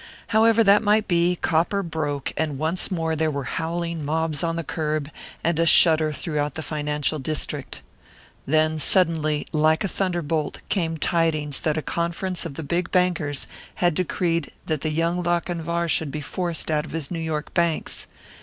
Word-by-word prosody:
However 225 0 +4
that 200 0 +6
might 215 0 +2
be, 175 0 +2
copper 175 +5 +1
broke, 150 -4 -3
and 155 -3 -1
once 160 +5 +2
more 165 -3 -1
there 160 0 +1
were 140 -2 -3
howling 165 +2 -3
mobs 155 0 0
on 165 0 0
the 165 - -3
curb, 155 -2 -2 0.3
and 165 -1 +1
a 165 - +3
shudder 160 -2 +6
throughout 150 -2 -2
the 160 - -4
financial 150 0 -1
district. 140 - -3 0.6
Then 155 +2 +2
suddenly, 155 -4 +2
like 155 +3 +2
a - - 0
thunderbolt, 170 -6 -2
came 165 -5 -1
tidings 155 -4 +1
that 155 -1 0
a 155 - -2
conference 170 +1 -2
of 140 - -10
the 160 - -5
big 170 +4 -1
bankers 175 -6 0 0.3
had 175 -1 +2
decreed 170 -1 -1
that 155 -3 -2
the 155 - -1
young 165 +3 0
Lochinvar 170 -1 -1
should 160 -2 +1
be 150 - -4
forced 170 0 -3
out 150 -1 +1
of - - -10
his 160 -4 -3
New 170 - -3
York 160 -2 -3
banks. 170 -2 0
160 Hz, 170 wpm, -24 LUFS, 155-175 Hz, 0.6 s, that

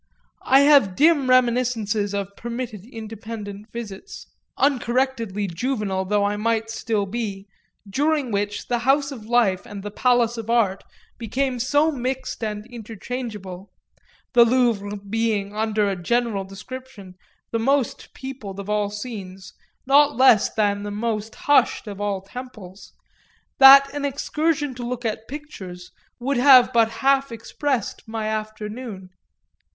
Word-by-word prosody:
I 270 +2 +6
have 280 -10 +5
dim 295 - +4
reminiscences 235 -5 +2
of 200 0 -4
permitted 235 -4 -6
independent 215 -2 -8
visits, 235 - -8 0.3
uncorrectedly 245 -6 0
juvenile 195 0 -2
though 205 +1 +1
I 205 +1 0
might 225 +1 -1
still 225 -3 -1
be, 200 -2 -5 0.4
during 285 +4 0
which 205 0 -2
the 240 -1 0
house 275 +3 +2
of 225 -6 -9
life 230 -6 +2
and 200 -1 -9
the 205 - -6
palace 240 0 +2
of 225 0 -7
art 210 -5 +1 0.4
became 250 +2 -2
so 290 +6 +2
mixed 255 -2 -4
and 210 -1 -4
interchangeable 220 -4 -7 0.6
the 240 -2 +8
Louvre 230 -4 +1
being, 205 0 -2
under 215 -1 +1
a 195 - -1
general 210 +2 -1
description, 210 0 -10 0.4
the 230 - 0
most 270 +2 0
peopled 250 -8 -7
of 200 +1 -5
all 210 -1 +1
scenes 200 -4 -8 0.3
not 280 -1 +4
less 255 -5 +5
than 205 -2 0
the 205 - -5
most 215 +1 -3
hushed 290 -3 +2
of 205 -2 -7
all 200 -2 -1
temples 205 -3 -10 0.7
that 275 +1 +9
an 290 -1 -4
excursion 295 +1 -1
to 245 -1 -7
look 240 0 -4
at 220 0 -3
pictures 195 -12 -9 0.3
would 270 +2 -1
have 255 -1 +7
but 230 -1 +4 0.2
half 275 -1 +3
expressed 230 +2 -3
my 220 -1 -4
afternoon. 215 -2 -5
225 Hz, 135 wpm, -23 LUFS, 205-255 Hz, 0.7 s, that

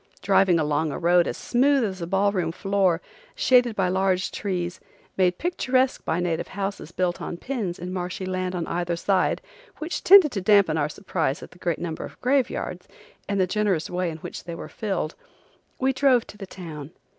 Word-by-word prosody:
Driving 190 -3 +4
along 150 0 0
a - - -4
road 175 +1 +3
as - - -3
smooth 270 +2 +2
as 190 -4 -3
a 170 - -3
ball 195 +2 +2
room 180 -5 -1
floor, 190 -1 +1 0.3
shaded 250 - +4
by 190 -3 +1
large 185 0 +1
trees, 180 -3 -3 0.4
made 180 -1 +2
picturesque 260 -7 0
by 165 - 0
native 175 -2 -1
houses 195 -4 -5
built 180 -1 -1
on 170 - -5
pins 215 -7 -3
in 180 +1 -6
marshy 180 +1 -4
land 185 0 -2
on 170 -2 -2
either 175 0 -2
side, 190 +2 +1 0.3
which 315 +3 -4
tended 375 -6 +8
to 200 - -3
dampen 200 -4 +4
our 150 -1 0
surprise 160 -4 -2
at - - -11
the 180 - -18
great 170 -2 -1
number 165 -2 -4
of - - -10
graveyards 260 0 -1 0.4
and 200 -1 0
the 185 - +4
generous 195 -4 0
way 180 0 -1
in 160 - -6
which - - -8
they 170 -1 -5
were - - -7
filled, 195 -7 -3 0.6
we 265 +1 +1
drove 265 -3 +3
to - - -13
the 195 - -7
town. 155 -7 -8
185 Hz, 190 wpm, -25 LUFS, 175-210 Hz, 0.6 s, tended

